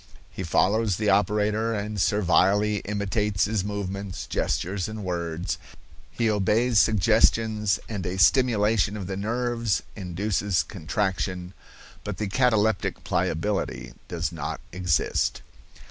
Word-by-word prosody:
He - - -7
follows 100 +4 +2
the 105 -1 +2
operator 105 +3 +1
and 105 -1 -3
servilely 105 +1 +3
imitates 105 0 0
his 105 -2 -1
movements, 100 -1 -4
gestures 95 +1 -1
and 110 -1 -6
words; 85 -2 -3 0.5
he 115 - -1
obeys 110 +3 +2
suggestions, 110 -1 +3
and 100 -4 -4
a 90 +1 -3
stimulation 105 -2 +3
of 100 - -5
the 95 +1 -4
nerves 115 +1 -1
induces 95 -1 -1
contraction, 90 +1 -3 0.5
but - - -5
the 105 - -2
cataleptic 110 -2 +1
pliability 100 +5 -1
does 85 0 -2
not 80 -4 -4
exist." 90 -3 0
105 Hz, 115 wpm, -25 LUFS, 95-110 Hz, 0.5 s, servilely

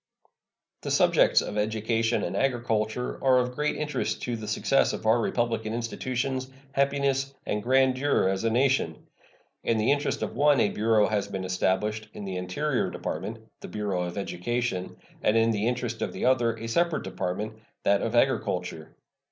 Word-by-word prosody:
The - - -4
subjects - - +4
of 105 - -3
education 110 +2 0
and - - -3
agriculture 120 -2 -1
are 130 -1 +5
of 125 0 +1
great 150 +3 -1
interest 150 0 -2
to 120 - -2
the 110 -2 -7
success - - +2
of - - -6
our 115 +2 +4
republican 115 -2 -1
institutions, 130 +2 -2 0.2
happiness, 140 0 +1
and 105 - -1
grandeur 130 0 +3
as 95 +1 -1
a 115 - +2
nation. 125 - +1 0.6
In 115 - +1
the 110 +4 +2
interest 145 +1 0
of - - -4
one 145 -2 +4
a 105 - +3
bureau 110 0 +3
has 105 -2 -1
been 95 -1 -4
established 95 +4 0
in 100 - -6
the 95 -1 -4
Interior 120 +10 -1
Department 110 +7 -5
the - - -8
Bureau 105 -4 -2
of 90 +2 -4
Education; 100 +1 -2 0.2
and 105 - +3
in 115 0 +4
the 105 0 0
interest 120 -2 -2
of - - -2
the - - -3
other, 120 -3 +3
a 115 - -7
separate 170 +7 +1
Department, 95 +4 -4 0.2
that 100 0 +3
of 115 - -2
Agriculture. 90 -10 0
115 Hz, 170 wpm, -27 LUFS, 105-130 Hz, 0.6 s, are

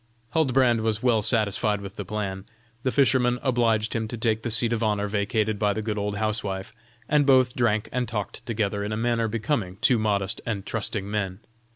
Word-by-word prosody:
Huldbrand 130 -6 +3
was 110 +1 -1
well 120 -4 +3
satisfied 105 -1 +3
with 100 -1 -9
the 100 - -5
plan; 95 -1 -4 0.4
the 130 - 0
fisherman 125 -3 +3
obliged 115 -4 +1
him 110 -1 -1
to 120 - -6
take 110 -1 0
the 120 - -3
seat 115 +1 +2
of 115 - -1
honor 105 -2 0
vacated 105 +1 0
by 105 -1 +2
the 110 - -3
good 105 -1 -2
old 100 0 -2
housewife, 105 -3 -3 0.3
and 150 -1 +3
both 130 -2 +4
drank 110 -3 +1
and 125 -1 -1
talked 105 -3 -5
together 105 -3 -1
in 105 - -3
a 110 - -2
manner 115 0 +1
becoming 110 -4 -2
two 120 -4 +3
honest 100 -2 0
and 105 -4 -3
trusting 105 -2 -2
men. 95 -3 -2
110 Hz, 195 wpm, -25 LUFS, 105-120 Hz, 0.4 s, both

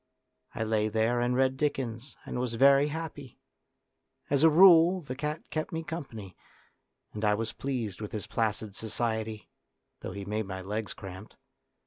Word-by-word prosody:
I 110 - -1
lay 110 -1 +1
there 110 +3 +1
and 120 +1 +1
read 130 0 +2
Dickens 130 -3 -2
and - - -4
was 125 -2 -2
very 140 +3 +6
happy. 150 -4 -6 0.9
As 140 -1 +3
a 160 - +8
rule 175 +2 +7
the 130 -5 -6
cat 150 +3 -4
kept 155 0 -2
me 165 0 -3
company, 120 - -7 0.8
and 105 - -5
I 105 -1 +4
was 115 +2 -3
pleased 120 -8 -4
with 105 - -5
his 105 - -4
placid 110 -2 -2
society, 110 -1 -3 0.5
though - - -6
he 100 0 -6
made 105 0 -2
my 95 -1 -5
legs 105 +3 -4
cramped. 95 +2 -10
115 Hz, 160 wpm, -29 LUFS, 110-140 Hz, 0.9 s, a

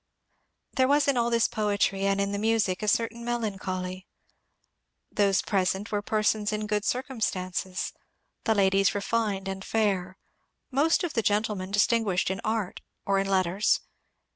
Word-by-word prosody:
There 260 -1 +3
was 285 +1 +3
in 280 - +3
all 235 -1 +2
this 230 -1 +3
poetry 200 -2 0
and 195 0 +1
in 200 0 0
the 200 - -2
music 220 -4 +1
a 215 - -2
certain 230 +3 0
melancholy. 190 -6 -3 1.0
Those 200 -2 +2
present 190 +1 0
were 205 -1 0
persons 215 0 +1
in 215 0 -2
good 210 0 -1
circum 255 0 -2
stances, 185 -1 -2 0.5
the 220 - +3
ladies 195 0 +3
refined 205 -2 -1
and 190 0 -4
fair, 195 -4 0 0.5
most 295 +7 +2
of 345 - -2
the 225 - +1
gentlemen 205 -3 0
distinguished 205 -2 +2
in 190 - -3
art 215 -4 -2 0.2
or 195 0 +2
in 195 - -1
letters. 190 +1 +2
205 Hz, 150 wpm, -27 LUFS, 190-225 Hz, 1.0 s, There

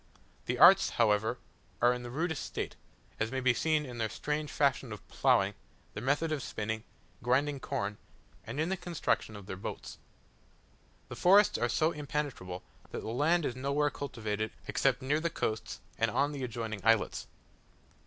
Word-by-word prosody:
The - - 0
arts, - - +8
however, 110 -1 +3 0.4
are 120 +1 +5
in 125 - -5
the 120 - -7
rudest 160 +3 -2
state; - - -4 0.4
as 110 +2 0
may 130 - -1
be 130 -1 +4
seen 155 +3 +1
in 120 -3 -7
their 110 -1 0
strange 150 +4 -2
fashion 140 -4 +1
of 105 - -9
ploughing, - - +3 0.4
their 105 - -5
method 145 +6 +1
of 150 -3 -1
spinning, 110 -1 -3 0.4
grinding 140 +4 +1
corn, 100 -4 -3 0.4
and 120 +6 -6
in 160 +3 +1
the 190 - 0
construction 170 - -1
of 100 -2 -9
their 95 - -5
boats. 95 - -7 1.1
The - - -6
forests 200 +3 +5
are 120 - +1
so 155 +7 +2
impenetrable, 145 - -4 0.3
that - - -5
the - - -5
land 150 +7 +2
is 120 - -2
nowhere 140 +3 +1
cultivated 110 -6 -3 0.2
except 135 -1 +1
near 145 +4 +2
the 170 +1 0
coast 110 -8 -3 0.2
and - - +3
on 145 +1 +1
the 140 -3 -5
adjoining 115 -3 -4
islets. 115 0 +2
130 Hz, 170 wpm, -31 LUFS, 110-150 Hz, 1.1 s, arts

